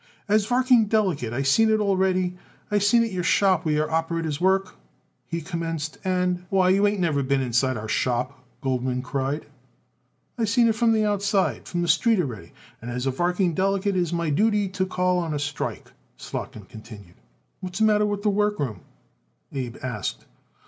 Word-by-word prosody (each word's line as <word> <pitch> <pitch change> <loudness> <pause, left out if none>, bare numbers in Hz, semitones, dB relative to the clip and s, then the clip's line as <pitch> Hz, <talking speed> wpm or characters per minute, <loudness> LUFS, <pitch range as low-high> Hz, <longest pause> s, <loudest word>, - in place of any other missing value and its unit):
"As 210 0 +2
varking 250 -2 +4
delegate 185 - +1
I 130 +3 -1
seen 220 +12 +4
it 220 0 +3
already. 190 -3 +1 0.4
I 205 - +3
seen 230 +4 +4
it 230 - -3
your 185 -1 -2
shop 190 -1 +3
where 155 -2 +1
your 155 +1 0
operators 165 -1 -1
work," 190 0 +2 0.5
he 170 -1 -3
commenced, 165 -2 -4
"and 180 -1 0
" - - -35
"Why, 190 -1 +3
you 200 +2 +4
ain't 205 -1 -1
never 160 -6 +1
been 135 0 +1
inside 130 0 +1
our 110 0 -6
shop," 125 +3 -1 0.2
Goldman 125 -1 -1
cried. 135 +3 -2 0.9
"I 225 - +2
seen 230 +2 +3
it 225 - +3
from 225 +1 +2
the 215 -1 +2
outside 200 -1 0
from 175 -1 -2
the - - -1
street 220 +7 +3
already 115 - -4 0.3
and 120 - -7
as 125 +1 -3
varking 175 +6 0
delegate 195 +2 0
it - - +2
is 175 -2 -2
my 170 -2 -1
duty 210 +4 +2
to 190 0 -2
call 180 0 +1
on 165 -3 -2
you - - -2
a - - -2
strike," 145 0 -4 0.3
Slotkin - - -7
concluded. 110 -5 -12 0.5
"What's 180 -1 -6
the 220 - +3
matter 210 -1 +3
with 205 -1 -3
the 210 - +3
workroom?" 195 - -1 0.7
Abe 130 -3 -4
asked. 125 -6 -4
180 Hz, 185 wpm, -24 LUFS, 140-205 Hz, 0.9 s, varking